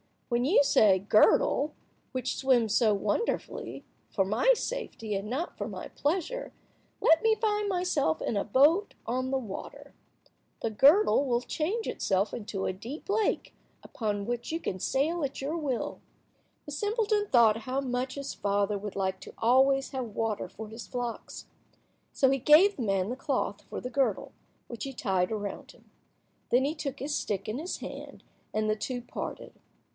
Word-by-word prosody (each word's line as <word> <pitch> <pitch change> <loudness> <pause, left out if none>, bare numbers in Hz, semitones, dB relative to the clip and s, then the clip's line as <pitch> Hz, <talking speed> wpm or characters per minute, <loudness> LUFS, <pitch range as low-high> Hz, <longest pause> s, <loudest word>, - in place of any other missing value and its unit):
When 240 0 +1
you 295 +1 +5
say, 210 -8 +5
'Girdle, 215 +8 +3 0.4
which 255 -1 -2
swims 240 -5 +3
so 220 -2 +4
wonderfully, 205 - -2 0.3
for 195 - +1
my 220 - +4
safety 460 - -4
and 200 +1 -3
not 295 +9 -3
for - - -3
my - - -7
pleasure, 380 +12 -2 0.5
let 325 0 +5
me 445 0 +4
find 420 -1 0
myself 355 - +1
in - - -1
a 200 - 0
boat 295 - +3
on 255 +2 -1
the 270 - +1
water,' 220 -7 -8 0.7
the 225 - -1
girdle 285 - +5
will 240 -2 +1
change 365 - -2
itself 195 +1 0
into 205 -4 -4
a - - -1
deep 240 - -9
lake, 425 +1 0 0.3
upon 205 -4 -3
which 240 +4 -3
you 325 - -1
can 185 - -4
sail 310 - 0
at 275 -1 -3
your 290 +4 -2
will." 275 -7 -2 0.7
The 295 - -8
simpleton 415 - 0
thought 230 - +5
how 260 +2 0
much 255 0 -2
his 280 -1 -5
father 200 0 0
would 205 0 -6
like 190 -1 -1
to - - -11
always 270 +3 +3
have 250 -5 -5
water 225 -2 -1
for 220 0 -9
his 225 +2 -9
flocks. 245 -2 -5 0.7
So 265 -1 +3
he 270 - +1
gave 320 +10 +6
the 255 - -2
man 195 -2 0
the 250 - -3
cloth 265 -8 -2
for - - -5
the 250 - -5
girdle, 270 -1 0 0.4
which 235 -1 -6
he 270 - -5
tied 190 -6 0
around 205 -2 -5
him. - - -24 0.6
Then 250 +2 +4
he 295 - 0
took 295 -4 -5
his 290 +3 -3
stick 200 -7 -2
in 225 +5 -3
his 345 +4 -4
hand, - - -8 0.3
and 215 0 0
the 215 0 +1
two 245 +3 -3
parted. - - -6
255 Hz, 170 wpm, -29 LUFS, 215-300 Hz, 0.7 s, gave